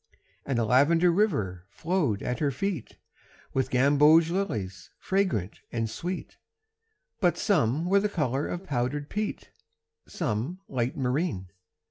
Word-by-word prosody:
And 135 Hz, -3 st, 0 dB
a 115 Hz, -, +2 dB
lavender 160 Hz, +9 st, +4 dB
river 110 Hz, -, 0 dB
flowed 155 Hz, -, -1 dB
at 125 Hz, -1 st, -2 dB
her 145 Hz, -, +2 dB
feet 160 Hz, -, -4 dB, 0.6 s
With 130 Hz, -1 st, 0 dB
gamboge 150 Hz, +5 st, +5 dB
lilies 105 Hz, -, -3 dB
fragrant 185 Hz, -, -1 dB
and 115 Hz, -1 st, -1 dB
sweet, 175 Hz, +11 st, -5 dB, 0.8 s
But 175 Hz, -3 st, +2 dB
some 155 Hz, -, +1 dB
were 195 Hz, +3 st, +4 dB
the 210 Hz, +1 st, 0 dB
color 145 Hz, -7 st, -1 dB
of 175 Hz, +2 st, -5 dB
powdered 145 Hz, 0 st, -2 dB
peat, 210 Hz, 0 st, -3 dB, 0.6 s
Some 125 Hz, -, -3 dB
light 125 Hz, -1 st, -2 dB
marine. 125 Hz, -, -1 dB
145 Hz, 125 wpm, -27 LUFS, 120-175 Hz, 0.8 s, gamboge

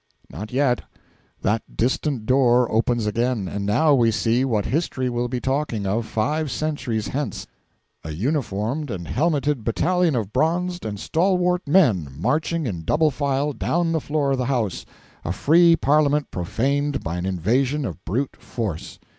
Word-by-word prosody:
Not 105 Hz, +7 st, -7 dB
yet. 130 Hz, -1 st, +2 dB, 0.6 s
That 105 Hz, +2 st, -1 dB
distant 125 Hz, 0 st, 0 dB
door 125 Hz, -1 st, +3 dB
opens 115 Hz, 0 st, +1 dB
again. 115 Hz, -1 st, 0 dB
And 100 Hz, +3 st, -4 dB
now 150 Hz, +9 st, +4 dB
we 120 Hz, -4 st, +4 dB
see 115 Hz, +2 st, +1 dB
what 110 Hz, -6 st, 0 dB
history 130 Hz, -4 st, -1 dB
will 120 Hz, 0 st, -1 dB
be 125 Hz, 0 st, -3 dB
talking 130 Hz, -6 st, -1 dB
of 110 Hz, +4 st, -1 dB
five 150 Hz, +7 st, -1 dB
centuries 125 Hz, -6 st, -2 dB
hence: 135 Hz, -6 st, -3 dB, 0.6 s
a -, -, -6 dB
uniformed 120 Hz, -, -2 dB
and 90 Hz, -6 st, -5 dB
helmeted 145 Hz, -, 0 dB
battalion 175 Hz, +8 st, +1 dB
of 110 Hz, -4 st, -2 dB
bronzed 175 Hz, +4 st, 0 dB
and 105 Hz, -2 st, -4 dB
stalwart 180 Hz, -, +1 dB
men 130 Hz, -, +4 dB
marching 155 Hz, -, 0 dB
in 90 Hz, -9 st, -4 dB
double 155 Hz, -, +2 dB
file 140 Hz, +1 st, -1 dB
down 170 Hz, +4 st, 0 dB
the 160 Hz, -2 st, 0 dB
floor 145 Hz, -2 st, 0 dB
of 135 Hz, -, 0 dB
the 125 Hz, -, 0 dB
House 120 Hz, -8 st, -1 dB, 0.4 s
a 85 Hz, -, -2 dB
free 165 Hz, -, +5 dB
parliament 150 Hz, -1 st, +2 dB
profaned 140 Hz, +10 st, -1 dB
by 85 Hz, +2 st, -3 dB
an 90 Hz, +1 st, -3 dB
invasion 125 Hz, -, 0 dB
of 90 Hz, -, -6 dB
brute 125 Hz, -, -2 dB
force! 100 Hz, -9 st, -5 dB
130 Hz, 155 wpm, -23 LUFS, 110-150 Hz, 0.6 s, free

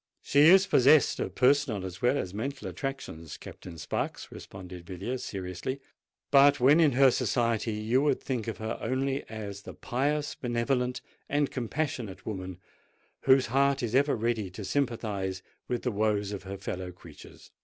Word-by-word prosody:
"She 145 Hz, +1 st, +5 dB
is 190 Hz, +2 st, +7 dB
possessed 140 Hz, 0 st, +5 dB
of -, -, -3 dB
personal 130 Hz, -6 st, +2 dB
as 90 Hz, +2 st, -8 dB
well 125 Hz, +3 st, +3 dB
as 90 Hz, -7 st, -3 dB
mental 135 Hz, +6 st, -4 dB
attractions, 135 Hz, -, -6 dB
Captain 85 Hz, -2 st, -10 dB
Sparks," 75 Hz, -, -4 dB
responded 90 Hz, -2 st, -10 dB
Villiers 100 Hz, +8 st, -5 dB
seriously. 95 Hz, +7 st, -4 dB, 0.5 s
"But, 140 Hz, +1 st, +6 dB
when 140 Hz, +6 st, +6 dB
in 155 Hz, -5 st, +5 dB
her 135 Hz, +1 st, +6 dB
society, 115 Hz, -2 st, 0 dB
you 110 Hz, +5 st, +1 dB
would 150 Hz, -, +2 dB
think 125 Hz, -5 st, -3 dB
of 115 Hz, -, -3 dB
her 110 Hz, +1 st, -4 dB
only 135 Hz, +3 st, -1 dB
as 105 Hz, -3 st, -6 dB
the -, -, -10 dB
pious—benevolent—and 130 Hz, 0 st, -1 dB
compassionate 125 Hz, -4 st, -3 dB
woman, 95 Hz, -4 st, -5 dB, 0.7 s
whose 130 Hz, 0 st, +6 dB
heart 140 Hz, +2 st, +2 dB
is 115 Hz, -1 st, -2 dB
ever 140 Hz, +2 st, +3 dB
ready 115 Hz, -3 st, -1 dB
to 95 Hz, +3 st, -8 dB
sympathise 100 Hz, -6 st, -2 dB, 0.2 s
with 120 Hz, -1 st, -2 dB
the 125 Hz, -, 0 dB
woes 105 Hz, -1 st, 0 dB
of 100 Hz, -, -5 dB
her 100 Hz, +1 st, -6 dB
fellow 95 Hz, -1 st, -5 dB
creatures." 90 Hz, -, -15 dB
120 Hz, 155 wpm, -29 LUFS, 100-135 Hz, 0.7 s, is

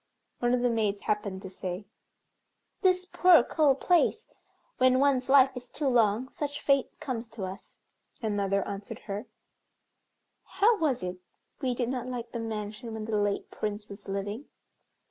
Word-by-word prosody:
One 240 Hz, 0 st, +2 dB
of 245 Hz, -, -1 dB
the 245 Hz, -, +3 dB
maids 210 Hz, -3 st, 0 dB
happened 200 Hz, -2 st, -2 dB
to 190 Hz, -, -6 dB
say, 185 Hz, +1 st, -5 dB, 1.0 s
"This 365 Hz, -1 st, +3 dB
poor 360 Hz, -6 st, +6 dB
cold 280 Hz, -1 st, +2 dB
place! 360 Hz, +5 st, +3 dB, 0.5 s
when 255 Hz, 0 st, +5 dB
one's 265 Hz, -2 st, +2 dB
life 270 Hz, -1 st, +6 dB
is 250 Hz, 0 st, -8 dB
too 290 Hz, -, -2 dB
long, 235 Hz, -1 st, +3 dB
such 290 Hz, 0 st, -4 dB
fate 275 Hz, -2 st, +1 dB
comes 245 Hz, -4 st, -4 dB
to 225 Hz, -3 st, -7 dB
us." 190 Hz, +2 st, -7 dB, 0.5 s
Another 200 Hz, -3 st, 0 dB
answered 200 Hz, +4 st, -6 dB
her, 205 Hz, +3 st, -5 dB, 1.2 s
"How 435 Hz, +1 st, +2 dB
was 270 Hz, -, +1 dB
it 180 Hz, 0 st, -4 dB, 0.4 s
we 255 Hz, -3 st, 0 dB
did 240 Hz, -1 st, -1 dB
not 250 Hz, -1 st, -3 dB
like 240 Hz, -2 st, -5 dB
the 235 Hz, -, -4 dB
mansion 220 Hz, 0 st, -5 dB
when 220 Hz, -1 st, -5 dB
the 220 Hz, -1 st, -2 dB
late 205 Hz, -1 st, -1 dB
Prince 210 Hz, 0 st, -4 dB
was 200 Hz, 0 st, -10 dB
living?" 205 Hz, +6 st, -4 dB
235 Hz, 160 wpm, -29 LUFS, 205-265 Hz, 1.2 s, poor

